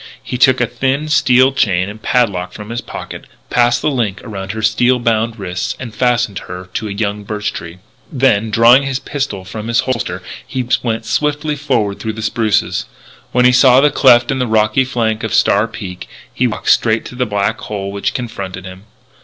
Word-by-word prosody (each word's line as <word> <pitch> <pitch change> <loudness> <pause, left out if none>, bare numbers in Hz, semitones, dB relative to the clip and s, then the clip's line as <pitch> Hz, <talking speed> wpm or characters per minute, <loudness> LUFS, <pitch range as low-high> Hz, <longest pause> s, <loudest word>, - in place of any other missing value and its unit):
He 125 - -5
took 130 -1 +5
a 120 - +3
thin 135 +5 -1
steel 130 -3 +4
chain 95 -7 +1
and 105 +2 -9
padlock 105 -8 0
from 105 +1 -9
his 120 +1 -3
pocket, - - -8 0.3
passed 120 -1 +2
the 155 - +2
links 110 -7 -2
around 95 -5 -6
her 110 0 -5
steel 120 +4 +3
bound 115 -1 0
wrists, 90 -3 -3
and 120 -4 -7
fastened 120 -4 0
her 90 +1 -9
to 110 - -3
a - - -5
young 105 0 -2
birch 105 +1 -3
tree. 85 +1 -8 0.3
Then, 120 -6 +2
drawing 115 +5 +6
his 135 -2 -2
pistol 135 -9 -4
from 110 +3 -6
its 115 0 +3
holster, 100 -9 -3 0.2
he 130 -2 -3
went 115 -2 -2
swiftly 150 +5 -1
forward 120 -9 -1
through 110 -1 -3
the 110 0 -6
spruces. 110 -1 0 0.5
When 125 0 +3
he 125 - +7
saw 125 0 +6
the 145 +1 +4
cleft 120 -3 +5
in 135 - -1
the 125 - 0
rocky 110 +4 +2
flank 115 -4 -1
of 110 - -1
Star 100 +3 +3
Peak, 95 -5 -8 0.3
he - - +1
walked - - 0
straight 115 -1 +2
to - - -9
the 125 0 -1
black 105 +1 -1
hole 100 -2 -5
which 100 0 -2
confronted 100 -6 -5
him. 95 +2 -11
115 Hz, 195 wpm, -16 LUFS, 100-125 Hz, 0.5 s, he